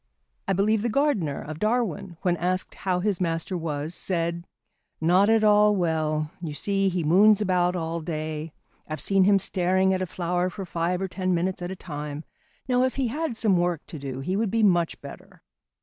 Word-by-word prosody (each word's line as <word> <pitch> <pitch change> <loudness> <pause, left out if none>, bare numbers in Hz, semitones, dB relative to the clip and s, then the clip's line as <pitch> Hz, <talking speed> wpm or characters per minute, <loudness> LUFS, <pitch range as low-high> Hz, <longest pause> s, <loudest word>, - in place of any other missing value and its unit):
I - - +2
believe 205 +3 +2
the 235 - 0
gardener 220 - 0
of 155 +1 -7
Darwin 215 -6 -1
when 180 -2 +2
asked 185 +2 -1
how 180 -2 -1
his 200 -2 -1
master 165 +1 -1
was, 155 -2 -3
said, 170 -1 -3 0.5
"Not 180 +6 +4
at 225 -1 +4
all 210 0 +5
well. 155 -3 0
You 155 -4 -5
see, 195 +3 +1
he 180 -2 -2
moons 200 +7 +5
about 180 -3 +1
all 165 -1 -3
day. 155 -1 -4 0.4
I've 155 0 -5
seen 195 -1 +3
him 200 0 +5
staring 190 0 +1
at 185 - -1
a 185 - -1
flower 180 +1 -1
for 195 +1 -7
five 175 +2 -1
or - - -1
ten 185 -1 -1
minutes 180 +2 -1
at 175 - -4
a 190 - -5
time. 150 -3 -6 0.4
Now, 250 -1 +2
if 260 - 0
he 265 -3 0
had 295 -2 -3
some 205 -6 +3
work 175 -1 -1
to 155 - -9
do, 135 -1 -5
he 185 +7 -2
would 215 +1 0
be 225 +2 +1
much 175 -4 +2
better." - - -12
180 Hz, 195 wpm, -25 LUFS, 165-200 Hz, 0.5 s, all